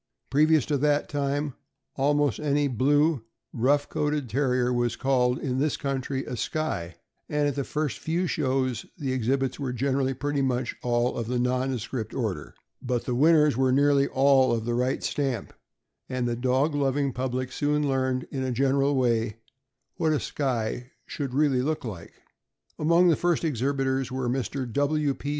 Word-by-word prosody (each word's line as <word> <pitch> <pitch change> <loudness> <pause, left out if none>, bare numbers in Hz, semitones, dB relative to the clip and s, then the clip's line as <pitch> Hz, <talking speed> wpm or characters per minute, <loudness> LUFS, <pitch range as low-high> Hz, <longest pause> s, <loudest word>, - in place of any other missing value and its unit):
Previous 155 0 +4
to 145 - 0
that 145 +1 +1
time, 145 0 -1 0.4
almost 145 -3 +1
any 145 -1 +1
blue, 145 +2 +2 0.3
rough 140 +5 +2
coated 150 -2 -1
Terrier 125 -1 +1
was 120 -1 0
called, 125 -2 +1
in 130 -2 -2
this 150 +1 0
country, 135 -1 -3
a - - -5
Skye, 100 - -3 0.3
and 150 -1 +1
at 145 - 0
the 140 - -2
first 150 +1 -3
few 170 +3 -1
shows 130 -7 -1
the 135 -6 -2
exhibits 130 +2 0
were 135 -3 -2
generally 135 +1 0
pretty 145 +1 -1
much 125 -2 -1
all 120 0 +1
of 115 -2 -3
the 125 +1 -1
nondescript 125 -2 -2
order; 105 - -3 0.3
but 125 -2 -2
the 125 - -1
winners 150 +1 +4
were 130 +1 +2
nearly 140 +1 +4
all 135 -1 +4
of 115 -1 -1
the 120 - -1
right 125 +2 0
stamp, 135 -7 -2 0.6
and 130 -1 -1
the 120 - -1
dog 130 +5 +1
loving 140 -1 0
public 130 0 -2
soon 150 +1 0
learned, 130 -1 0
in 135 - -3
a 130 -1 -1
general 135 +3 +2
way, 115 -4 +1 0.6
what 160 -2 +2
a 150 - +1
Skye 125 -2 -3
should 135 -4 -5
really 140 -3 +3
look 150 0 -2
like. 90 -8 -7 0.7
Among 170 +3 +4
the 165 - +4
first 175 +2 0
exhibitors 135 -2 0
were 130 -1 -2
Mr. 130 +1 -2
W. 145 0 +1
P. 145 - -6
135 Hz, 165 wpm, -26 LUFS, 125-145 Hz, 0.7 s, Previous